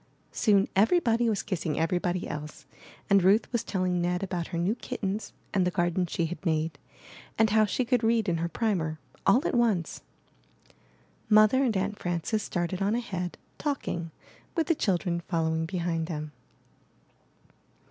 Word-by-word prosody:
Soon 200 -3 +3
everybody 230 - +3
was 210 -3 -1
kissing 170 -6 -2
everybody 175 +2 0
else, 150 0 -7 0.4
and 200 -1 +5
Ruth 200 +5 +4
was 235 -2 0
telling 185 -4 0
Ned 180 +2 0
about 180 -3 -3
her 170 - -4
new 175 +5 +1
kit 250 +1 -6
tens, 200 +2 -2 0.2
and 190 - +3
the 180 - +2
garden 175 0 0
she 170 0 -1
had 175 +4 -6
made, 160 -2 -1 0.6
and 220 -1 +3
how 215 0 +5
she 245 +5 -1
could 245 -1 +1
read 225 -1 +2
in 170 -2 +1
her 170 +1 -2
primer, 170 -7 -1 0.3
all 250 +11 +5
at - - -2
once. 220 -9 +1 1.3
Mother 215 +5 +6
and 230 -6 +1
Aunt 200 +2 -2
Fran 175 -2 -2
ces 220 +3 0
started 180 0 -2
on 200 +3 +2
ahead, 185 -7 -3 0.2
talking, 220 - -2 0.5
with 330 -2 +1
the 335 - +3
child 195 - 0
ren 170 -1 0
following 160 -2 0
behind 170 -2 -2
them. 155 -3 -5
185 Hz, 165 wpm, -28 LUFS, 170-220 Hz, 1.3 s, Mother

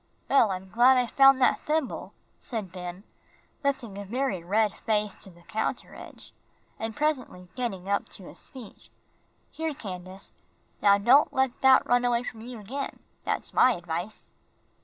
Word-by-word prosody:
"Well, 270 -6 +5
I'm 190 0 -4
glad 245 +6 +5
I 250 - +3
found 270 +2 +6
that - - +4
thimble," 305 -3 -2 0.2
said 215 -7 -5
Ben, 180 +1 -7 0.6
lifting 250 -8 -2
a - - -5
very 235 -3 -2
red 210 +3 +2
face 210 -2 -1
to - - -12
the 175 -1 -18
counter 220 +5 -3
edge, - - -12 0.5
and 225 0 -4
presently 260 -12 -2
getting 195 -7 -4
up 200 0 0
to 195 - -8
his - - -8
feet. 255 -8 -12 0.6
"Here, 320 -2 -3
Candace, 185 -3 -8 0.5
now 200 -1 +6
don't 250 +8 +5
let 265 -2 0
that 265 -1 +6
run 245 0 +3
away 240 -1 +1
from 225 -2 -7
you 240 0 -8
again, 265 +7 -5 0.3
that's - - -2
my 255 - +5
advice." 175 +4 -5
225 Hz, 160 wpm, -27 LUFS, 195-260 Hz, 0.6 s, found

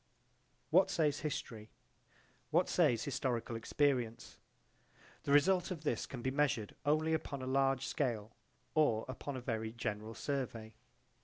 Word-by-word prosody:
What 185 +4 +6
says 155 -6 +1
history? 125 -8 -4 0.8
What - - +3
says 115 -2 +3
historical 125 -5 -2
experience? 125 -1 0 0.9
The 140 - 0
result 180 +5 +4
of 170 -5 -5
this 120 -7 -1
can 125 -3 -7
be 130 - 0
measured 135 -7 +1
only 155 +2 +3
upon 140 -4 -2
a - - -3
large 135 0 +2
scale 115 -6 -1 0.4
or 120 -8 +3
upon 130 +2 -5
a - - -5
very 110 -2 -2
general 110 -1 -4
survey. 115 -3 -3
130 Hz, 135 wpm, -35 LUFS, 115-145 Hz, 0.9 s, What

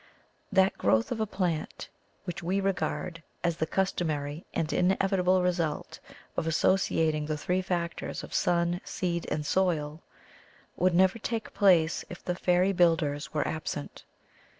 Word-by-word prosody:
That 190 -1 +3
growth 110 0 +2
of 230 - -2
a 220 - 0
plant 175 -6 -2 0.4
which 180 0 -5
we 185 +3 0
regard 185 -3 -2 0.2
as 170 -2 0
the 160 - -1
customary 160 -5 -1
and 160 -1 -1
inevitable 185 0 +2
result 170 -4 -1 0.4
of 160 - -1
associating 160 -3 +2
the 155 -1 -1
three 180 +5 0
factors 175 -2 -3
of - - -9
sun, 175 +1 +1
seed, 170 -2 -3
and 150 -1 -2
soil 160 -3 0 0.7
would 180 0 +2
never 190 +5 +4
take 225 0 -4
place 175 -6 +4
if 175 - -10
the 180 - 0
fairy 180 +2 +2
builders 165 -5 +2
were 150 - 0
absent. 155 -2 -5
175 Hz, 140 wpm, -29 LUFS, 160-185 Hz, 0.7 s, never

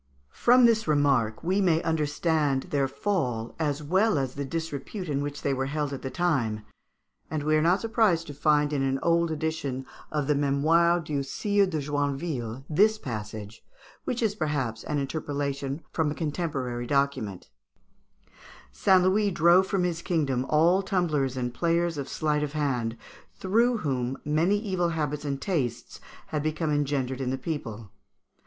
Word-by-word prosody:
] - - -39
From 250 +1 +5
this 225 -3 +3
remark 140 -7 +2
we 190 +4 +1
may 170 -4 +3
understand 150 -3 +1
their 140 -2 +2
fall 130 - -2
as 150 -2 -1
well 190 +5 +2
as 135 -2 -1
the 140 - -4
disrepute 165 +5 -5
in 140 -2 -1
which 145 0 -5
they 140 - +1
were 135 0 -1
held 145 0 -2
at 135 - -5
that 130 -1 -5
time, 120 -12 0 0.6
and 155 -1 -2
we 155 +1 +2
are 155 - +3
not 175 +5 +3
surprised 220 -7 +2
to 145 - -8
find 150 0 +2
in 140 - 0
an 135 0 +1
old 170 0 +3
edition 155 -4 -3 0.3
of 150 -2 -1
the 150 - +2
"Mémoires 160 +5 +3
du 145 -2 -1
Sire 200 +8 +1
de 170 -4 -2
Joinville" 140 -4 -2
this 210 +8 +3
passage, 110 - -7 0.4
which 245 -1 -2
is, 215 -2 +2
perhaps, 145 - -2
an 150 - -1
interpolation 140 0 -3
from 160 -2 0
a 145 - -3
contemporary 140 -7 -3
document: 140 -9 -1 1.2
"St. 190 -2 +4
Louis 200 +3 +3
drove 175 +1 +4
from 190 -2 0
his 170 -2 -1
kingdom 135 -8 0
all 170 +5 +4
tumblers 155 - 0
and 125 -1 -2
players 170 0 0
of 140 - -5
sleight 150 -1 0
of 150 -1 -3
hand, 125 -6 -1 0.4
through 230 +5 +2
whom 130 - -2
many 160 +7 +2
evil 185 -5 -1
habits 150 -2 -2
and 140 -1 -2
tastes 125 - -3 0.3
had 155 -5 -1
become 155 +1 -1
engendered 135 -3 -1
in 130 - -1
the 130 - -1
people." 115 - -5
150 Hz, 165 wpm, -27 LUFS, 135-170 Hz, 1.2 s, From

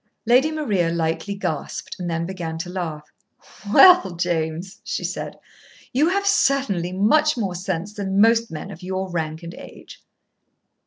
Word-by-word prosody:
Lady 250 +6 +4
Maria 210 - 0
lightly 165 +4 -2
gasped, 160 -4 -4
and 175 -1 -3
then 165 0 -1
began 170 -3 -5
to 175 +2 -5
laugh. 160 -5 -5 0.6
"Well, 360 - +7
James," 170 +1 -2
she - - -3
said, - - -4 0.6
"you 295 +6 +3
have 400 +2 0
certainly 275 - +1
much 290 +11 +3
more 200 -6 -1
sense 185 +2 -4
than 200 -2 -2
most 230 +1 +4
men 155 - -7
of 165 - -11
your 185 0 -4
rank 160 -1 -3
and 170 +1 -7
age." - - -13
185 Hz, 150 wpm, -22 LUFS, 170-230 Hz, 0.6 s, Well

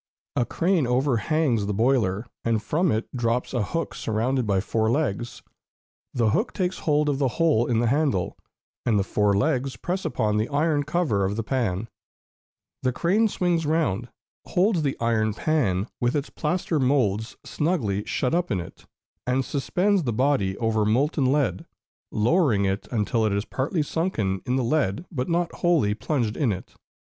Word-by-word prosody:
A 120 - +2
crane 170 -5 +1
overhangs 125 -1 +1
the 105 - -1
boiler, 110 -3 +1 0.2
and 115 -1 +1
from 160 - +1
it 110 +1 -1
drops 120 +1 -1
a 120 - +1
hook 165 +11 -2
surrounded 115 +3 -1
by 100 -2 +2
four 110 +2 0
legs; 120 -4 -1 0.7
the 115 -4 +1
hook 215 - 0
takes 185 -2 -1
hold 150 -1 +1
of 140 -2 0
the 140 - +2
hole 155 -9 +3
in 120 - +1
the - - +1
handle, 135 - +1 0.5
and 110 -3 +2
the 100 - +2
four 105 0 +1
legs 135 +1 0
press 185 +2 -3
upon 110 -9 0
the 110 +2 0
iron 150 +1 +1
cover 150 - 0
of 95 +2 0
the 115 - -2
pan; 115 -5 -1 0.9
the 130 - +1
crane 190 - +2
swings 175 -5 0
round, 135 - 0 0.4
holds 185 -1 +2
the 140 -3 -1
iron 110 -2 +1
pan 110 - 0
with 120 +2 +1
its 145 0 -2
plaster 165 0 -1
moulds 125 -5 +1
snugly 120 - -1
shut 125 - -1
up 175 +1 +1
in 100 -6 0
it, 90 +2 -10 0.4
and 130 +1 +1
suspends 180 +9 +1
the 125 -7 -1
body 115 -5 +1
over 115 -2 +1
molten 130 +5 +2
lead, 130 - 0 0.4
lowering 115 - +2
it 95 +1 -2
until 115 0 0
it 110 - +2
is 100 +2 -1
partly 150 +4 -1
sunken 115 - -1
in 125 - +1
the 130 - +1
lead 120 - 0
but 130 -4 -3
not 170 0 0
wholly 165 -12 +2
plunged 110 0 -1
in 135 -7 +1
it. 95 -1 -6
125 Hz, 170 wpm, -25 LUFS, 110-155 Hz, 0.9 s, hole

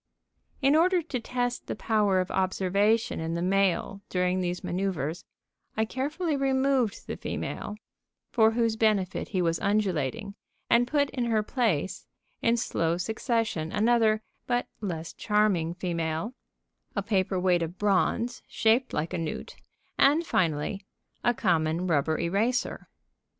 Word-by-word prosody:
In 275 +2 +5
order 355 +2 +4
to 280 -5 -3
test 245 +1 -2
the - - -3
power 210 -4 +2
of 185 - -2
observation 195 +4 +1
in 160 +1 -2
the 170 - -2
male 195 +1 +1
during 180 0 +1
these 180 0 -2
manœuvers, 175 -4 -2 0.5
I 220 - +2
carefully 295 +7 -2
removed 265 -4 +1
the - - -4
female, 210 - -4 0.6
for 220 -2 +5
whose 230 -1 +1
benefit 210 -5 +1
he 185 -3 0
was 165 -1 +1
undulating, 200 - 0 0.4
and 240 +1 +5
put 285 0 +1
in 245 -2 -1
her 220 -2 +1
place, 210 - -1 0.3
in 235 +1 +3
slow 170 -7 0
succession, 220 -4 -1
another 220 -1 +3 0.2
(but 245 0 +1
less 170 -6 -4
charming) 205 -6 +1
female, 170 +3 -2 0.6
a 200 - 0
paper 190 -3 0
weight 180 -1 +3
of 165 +2 -4
bronze 210 +4 +1
shaped 235 +4 +2
like 160 +4 -2
a 180 - -1
newt, 165 -2 -5 0.4
and, 305 +5 +5
finally, 170 - 0 0.4
a 240 - +3
common 165 -3 +1
rubber 155 -2 +1
eraser. 215 +9 0
205 Hz, 135 wpm, -28 LUFS, 175-235 Hz, 0.6 s, In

